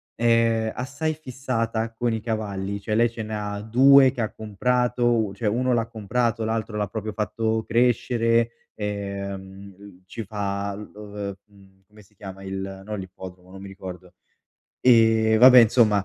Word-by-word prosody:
è 115 -1 +2
assai 140 +5 -3
fissata 115 -6 -3
con 120 +1 -1
i 110 - -3
cavalli, 100 -3 -3
cioè, 105 +1 -2
lei 120 +1 +3
ce 115 -1 -7
ne 110 0 -5
ha 105 -1 -4
2 130 +4 +6
che 120 - -5
ha 110 - -2
comprato, 120 +3 0 0.2
un 95 - -8
cioè, 105 +2 -1
uno 125 +4 0
l'ha 115 -1 0
comprato, 115 +1 -1
l'altro 110 -1 -2
l'ha 105 -1 -1
proprio 110 +2 -5
fatto 110 +1 -1
crescere, 115 -1 +2 0.2
ehm, 100 -1 -6
l 100 -2 -15
ci 115 +5 -7
fa 100 -1 -3
lo 105 0 -10
v 100 -1 -5
mhmm, 95 -2 -22
come 105 +1 -18
si 105 +2 -28
chiama 95 -1 -10
il 95 0 -6
no, 105 +1 -4
l'ippodromo, 95 -1 -10
non 95 0 -11
mi 100 - -8
ricordo, 90 -2 -10 0.7
ehm, 110 -2 +4
vabbè, 125 +2 +9
insomma 110 -3 +4
110 Hz, 165 wpm, -24 LUFS, 100-115 Hz, 0.7 s, vabbè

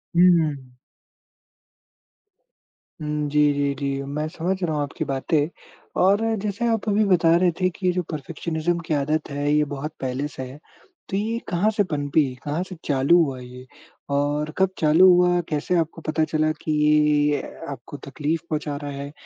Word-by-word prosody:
हुँ, 175 - +6 0.2
हुँ। 140 -4 -5 2.3
हुँ, 150 0 -2
जी, 150 +1 +2
जी, 140 0 0
जी, 140 -1 -2
मैं 145 +3 -3
समझ 180 +4 -2
रहा 165 -3 0
हूँ 150 - 0
आपकी 145 - -4
बातें 145 +3 0 0.5
और 200 +3 +4 0.2
जैसे 205 +3 -2
आप 225 -2 -1
अभी 210 +1 +3
बता 170 -4 +4
रहे 175 0 +3
थे 185 - +3
कि 185 +1 -8
ये - - +4
जो 180 - 0
परफेक्शनिज़्म 160 +2 -2
की - - 0
आदत 150 +2 0
है 145 +1 -1
ये 150 0 +4
बहुत 145 +3 -5
पहले 130 +2 -2
से 145 - -9
है, 140 - -12 0.5
तो 190 - -1
ये 225 +3 -1
कहाँ 190 +3 +2
से 205 - +4
पनपी, 150 -3 +1 0.2
कहाँ 150 +4 -2
से 185 - -7
चालू 140 +4 +4
हुआ 135 -4 -3
ये? 125 0 -11 0.5
और 145 +2 0
कब 190 0 +3
चालू 160 +4 +6
हुआ, 180 0 +4
कैसे 155 +4 -1
आपको 165 0 -2
पता 155 0 0
चला 155 0 +1
कि 155 - -2
ये 150 - +5
ये 150 0 +3
ये 145 - 0 0.3
आपको 135 +1 -8
तकलीफ 150 +3 -2
पहुँचा 150 -2 -2
रहा 145 - -4
है? 140 +1 -6
155 Hz, 180 wpm, -23 LUFS, 145-175 Hz, 2.3 s, हुँ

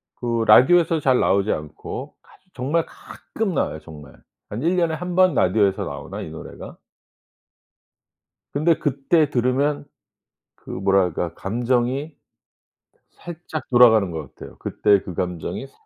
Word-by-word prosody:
그 115 -2 -1
라디오에서 165 +9 +5
잘 130 -3 +2
나오지 100 +2 +2
않고 75 0 -6
가 - - -24 0.2
정말 145 +6 0
가끔 220 -4 -6
나와요, 80 - -1
정말. 75 -3 -12 0.4
한 105 - -5
1 175 +3 +2
년에 170 -2 +1
1 180 +2 -5
번 185 -2 +4
라디오에서 95 0 +2
나오나, - - -7
이 - - -7
노래가? 80 - -10 1.8
근데 155 +3 +2
그때 145 +3 +1
들으면 140 +3 0 0.7
그 - - -16
뭐랄까. 95 -3 0
감정이 125 +7 -1 1.0
살짝 170 -2 -8
돌아가는 110 -6 +5
것 80 -5 -7
같아요. - - -12
그때 100 -2 +2
그 90 - -8
감정이 90 - -4
살짝. 135 - -30
125 Hz, 265 characters per minute, -22 LUFS, 95-155 Hz, 1.8 s, 라디오에서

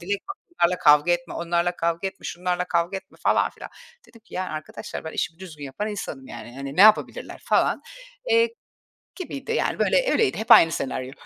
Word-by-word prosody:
"Dilek, 200 +3 -2
bak 395 - -5 0.3
onlarla 180 +1 +2
kavga 150 +4 +5
etme, 175 -1 -3
onlarla 170 +1 -1
kavga 170 +3 -1
etme, 190 - -15
şunlarla 180 0 -2
kavga 175 +1 0
etme." 190 - -12
falan - - +2
filan. - - -11 0.4
Dedim 230 - -18
ki 225 - -16
"Ya 185 - -1
arkadaşlar, 155 -2 -7
ben 160 - -6
işimi 165 - -3
düzgün 160 -6 -9
yapan 140 +11 -4
insanım 155 -10 -6
yani. 120 0 -10
Hani 140 +1 -6
ne - - +3
yapabilirler?" 215 +1 +4
falan, - - +2 0.5
eee, 460 0 +5 0.7
gibiydi. 335 - -6
Yani - - -1
böyle - - +2
öyleydi. 445 -3 +2
Hep 225 +3 -2
aynı 165 -8 +9
senaryo. 130 -3 -3
175 Hz, 185 wpm, -24 LUFS, 160-210 Hz, 0.7 s, aynı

